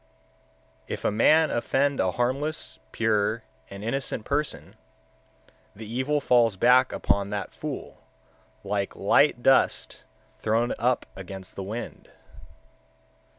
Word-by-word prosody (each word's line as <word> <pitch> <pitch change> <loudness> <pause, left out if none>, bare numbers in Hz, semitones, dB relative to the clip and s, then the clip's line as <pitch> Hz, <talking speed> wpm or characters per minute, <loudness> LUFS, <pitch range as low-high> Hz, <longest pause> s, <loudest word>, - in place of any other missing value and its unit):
125. - - -9
If - - -11
a - - +3
man 155 +9 +4
offend 135 +4 0
a 95 -1 +1
harmless, 135 +6 -2
pure, 110 0 0 0.3
and 100 +1 -9
innocent 120 -1 -2
person, 105 - -2 1.0
the 110 +2 -9
evil 130 +7 -1
falls 120 -6 +3
back 125 +4 +5
upon 100 0 0
that 100 -1 -4
fool, - - -7 0.6
like 100 0 -2
light 120 +5 +3
dust 135 - +2 0.4
thrown 115 +2 +1
up 125 +1 +1
against 95 0 -9
the - - -5
wind. 110 +5 -7
115 Hz, 115 wpm, -26 LUFS, 100-130 Hz, 1.0 s, back